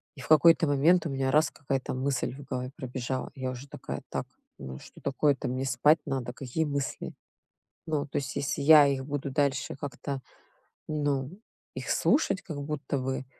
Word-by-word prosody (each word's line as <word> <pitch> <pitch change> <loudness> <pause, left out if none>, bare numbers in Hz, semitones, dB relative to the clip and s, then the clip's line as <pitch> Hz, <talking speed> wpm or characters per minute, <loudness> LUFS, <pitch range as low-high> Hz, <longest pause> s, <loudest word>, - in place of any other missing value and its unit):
И 130 - -10
в - - -9
какой-то 165 +2 +6
момент 155 +5 +4
у - - -1
меня 135 -1 0
раз- 155 +3 +4
какая-то 135 -2 -3
мысль 130 0 -1
в 145 - -10
голове 130 -1 -4
пробежала. 130 0 -4
Я 130 -1 -3
уже 130 +2 -8
такая: - - -6
"Так, - - -3 0.3
ну 65 -1 -7
что - - -14
такое-то, 140 0 +1
мне 130 +2 -2
спать 135 +5 +4
надо, 125 -2 -3
какие 135 +5 -2
мысли?" 140 -2 -3 0.7
Ну, 150 -2 0
то - - -3
есть, 135 -1 -3
если 140 0 -1
я 150 0 +9
их 135 -1 -1
буду 145 -1 -3
дальше 140 -2 0
как-то, 135 0 -5 0.7
ну, 145 -3 -1 0.4
их - - -5
слушать 240 -10 +2
как 155 -5 -5
будто 145 -1 -3
бы, 130 0 -3
140 Hz, 175 wpm, -29 LUFS, 130-145 Hz, 0.7 s, я